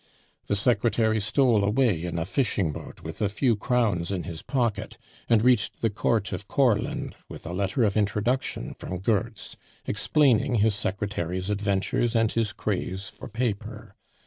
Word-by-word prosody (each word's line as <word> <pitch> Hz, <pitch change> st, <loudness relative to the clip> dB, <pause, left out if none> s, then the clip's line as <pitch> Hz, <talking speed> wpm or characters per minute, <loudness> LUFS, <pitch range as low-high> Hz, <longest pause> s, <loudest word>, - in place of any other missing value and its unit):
The 100 Hz, -, +1 dB
secretary 110 Hz, 0 st, +2 dB
stole 110 Hz, +1 st, +3 dB
away 105 Hz, -5 st, +2 dB
in 85 Hz, -1 st, -3 dB
a 80 Hz, -, -1 dB
fishing 100 Hz, -, 0 dB
boat -, -, -9 dB
with 80 Hz, +4 st, -7 dB
a 105 Hz, -, +2 dB
few 115 Hz, +3 st, +2 dB
crowns 105 Hz, -6 st, 0 dB
in 95 Hz, -3 st, -2 dB
his 85 Hz, -3 st, -7 dB
pocket, 115 Hz, -5 st, -1 dB, 0.3 s
and 115 Hz, -2 st, +4 dB
reached 125 Hz, -4 st, +2 dB
the 115 Hz, -, +2 dB
court 110 Hz, 0 st, 0 dB
of 95 Hz, +2 st, -5 dB
Courland 120 Hz, -7 st, +1 dB
with -, -, -10 dB
a 85 Hz, -, -5 dB
letter 100 Hz, +5 st, 0 dB
of 100 Hz, -3 st, +2 dB
introduction 105 Hz, -, 0 dB
from 90 Hz, -, -6 dB
Goertz, 100 Hz, +2 st, -2 dB, 0.3 s
explaining 125 Hz, +3 st, +2 dB
his 110 Hz, 0 st, +3 dB
secretary's 95 Hz, -2 st, -2 dB
adventures 100 Hz, +3 st, 0 dB
and 115 Hz, -1 st, +3 dB
his 115 Hz, -2 st, 0 dB
craze 95 Hz, -1 st, -3 dB
for -, -, -10 dB
paper. 115 Hz, -2 st, -4 dB
105 Hz, 155 wpm, -26 LUFS, 95-115 Hz, 0.3 s, and